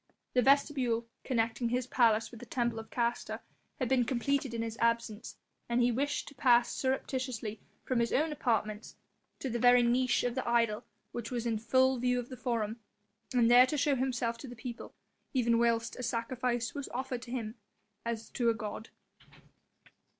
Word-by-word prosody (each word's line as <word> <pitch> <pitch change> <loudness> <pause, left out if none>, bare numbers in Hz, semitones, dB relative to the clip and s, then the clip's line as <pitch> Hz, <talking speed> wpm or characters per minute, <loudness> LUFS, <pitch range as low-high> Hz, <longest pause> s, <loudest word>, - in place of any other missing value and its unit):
The 250 - +4
vestibule 265 -3 +2 0.2
connecting 230 -1 0
his 250 +1 0
palace 230 -3 +3
with 235 - -10
the 245 - -9
temple 235 -1 -1
of 220 - -10
Castor 235 0 -1 0.4
had 255 - -1
been 255 0 +3
completed 265 +2 0
in 230 -1 -2
his 225 -1 -4
absence, 230 -2 0 0.3
and 235 +1 +2
he 245 0 +4
wished 285 +5 -1
to - - -9
pass 245 -3 +4
surreptitiously 255 -5 -2 0.3
from 255 -2 +1
his 235 0 +1
own 310 +3 +2
apartments 220 -6 -1 0.5
to - - -2
the 240 -1 -2
very 245 0 +6
niche 245 +1 +2
of 245 -1 0
the 260 -1 -2
idol 230 -1 +2 0.3
which 235 -2 -5
was 240 -2 -3
in 225 -2 0
full 260 +3 +3
view 250 0 +1
of 245 - -6
the 255 - -6
Forum 225 -2 -1 0.6
and 240 -1 +5
there 250 +1 +8
to 300 - -1
show 285 0 +2
himself 240 -3 -1
to 275 - -8
the 245 - -9
people, 235 +1 -8 0.4
even 235 -2 +3
whilst 230 -1 +1
a - - -6
sacrifice 240 0 -1
was 280 -1 -5
offered 255 -1 -3
to 235 - -10
him 225 -4 -3 0.5
as 230 -1 -4
to 240 -3 +1
a 230 - +2
god. 220 -1 -6
240 Hz, 180 wpm, -31 LUFS, 230-255 Hz, 0.6 s, there